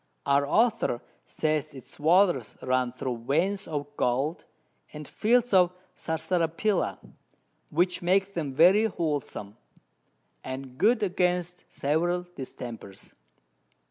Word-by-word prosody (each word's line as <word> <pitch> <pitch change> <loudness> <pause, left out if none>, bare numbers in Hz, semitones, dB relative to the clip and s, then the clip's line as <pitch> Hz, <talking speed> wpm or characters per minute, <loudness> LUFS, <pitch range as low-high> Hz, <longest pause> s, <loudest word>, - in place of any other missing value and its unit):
Our 140 0 +3
Author 220 - +2 0.3
says 155 -1 -1
its 130 - -12
Waters 165 - +3
run 130 -1 +1
thro' 125 0 -4
Veins 170 - 0
of 145 -3 -3
Gold, 135 +7 0 0.5
and 150 -1 -8
Fields 240 +1 +1
of 180 -2 +5 0.2
Sarsaparilla, 165 +4 -1 0.7
which 180 +3 +1
make 195 +3 +2
them 155 -6 -3
very 185 +10 +5
wholesom, 145 - -3 0.9
and 130 0 -7
good 220 +4 +3
against 180 -2 -1
several 175 +5 0
Distempers. 115 -7 -8
160 Hz, 105 wpm, -27 LUFS, 135-185 Hz, 0.9 s, of